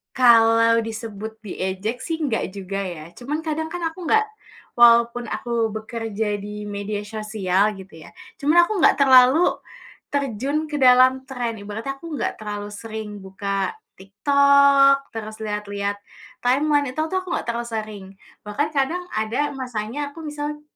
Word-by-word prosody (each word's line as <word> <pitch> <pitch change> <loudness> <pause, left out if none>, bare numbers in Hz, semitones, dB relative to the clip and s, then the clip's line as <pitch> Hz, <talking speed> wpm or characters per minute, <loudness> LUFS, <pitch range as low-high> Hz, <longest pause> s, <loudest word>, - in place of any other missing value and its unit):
Kalau 230 -2 +5
disebut 220 -1 -7
diejek, 195 +4 -3
sih, 325 -1 -3
enggak 255 -7 -1
juga, 195 0 -4
ya. 170 -4 -7
Cuma, 290 +5 -3
kadang, 320 0 -2
kan, 355 -1 -5
aku 355 +1 -10
enggak 435 +4 +4 0.5
walaupun 235 0 +5
aku 230 -1 -2
bekerja 220 -1 -3
di 210 +1 -7
media 205 0 -4
sosial, 210 -2 0
gitu, 190 -5 -12
ya, - - -15 0.2
cuma 310 +5 +4
aku 405 +5 0
enggak 340 - +5
terlalu 260 +4 +6 0.6
terjun 280 +3 -1
ke 295 - -3
dalam 260 0 +5
tren. 245 -4 -4
Ibaratnya 220 +7 -6
aku 330 +2 -9
enggak - - -2
terlalu 205 -1 -5
sering 215 0 -7
buka 195 - -3 0.2
TikTok, 275 +6 +4
terus 220 -1 -7
lihat-lihat 205 -1 -3 0.5
timeline, 290 +3 +3
itu 310 - -6
itu 320 +4 -2
aku 370 -1 -4
enggak - - -3
terlalu 235 0 -3
sering. 215 -3 -5 0.4
Bahkan 285 +9 -1
kadang 310 +5 -1
ada 230 +7 0
masanya 255 +3 -4
aku 330 - -10
misal, 295 -1 -5
230 Hz, 145 wpm, -22 LUFS, 210-280 Hz, 0.6 s, terlalu